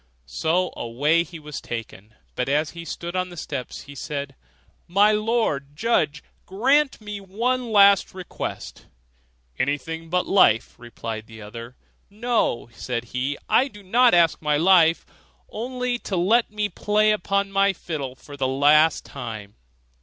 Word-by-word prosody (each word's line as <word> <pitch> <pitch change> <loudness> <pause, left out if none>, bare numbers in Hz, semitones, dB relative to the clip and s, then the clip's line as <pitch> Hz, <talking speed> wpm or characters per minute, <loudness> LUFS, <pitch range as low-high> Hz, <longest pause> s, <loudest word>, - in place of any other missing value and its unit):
So 160 - 0
away 145 +8 +1
he 170 +1 -10
was 150 -2 -8
taken; 110 -2 -8 0.2
but 125 +1 -2
as 150 +2 +1
he 170 0 -9
stood 170 +1 -6
on 185 0 -1
the 175 - -11
steps 140 -5 -5
he 145 - -12
said, 140 -1 -5 0.5
'My 200 +4 +4
Lord 210 -11 0
Judge, 155 -7 0 0.2
grant 270 +9 +2
me 210 -1 -7
one 235 +5 -2
last 200 -2 +5
request.' 185 -1 -7 0.7
'Anything 160 +4 -2
but 180 +1 +1
thy - - -12
life,' 115 - +4
replied 115 -2 -7
the 110 -1 -11
other. 115 +4 -9 0.3
'No,' 220 - -1
said 120 0 -4
he, 130 +3 -1
'I 265 - +4
do 205 -6 -14
not 235 +3 +4
ask 170 -2 +3
my 150 -1 +1
life; 165 -1 +4 0.5
only 250 +2 -3
to 195 - -3
let 220 +7 +3
me 210 0 -1
play 210 +1 +2
upon 200 -1 0
my 195 0 +3
fiddle 145 -8 -5
for 145 +2 -12
the 135 -2 -1
last 150 +4 +4
time. 110 -6 -8
170 Hz, 150 wpm, -23 LUFS, 140-210 Hz, 0.7 s, last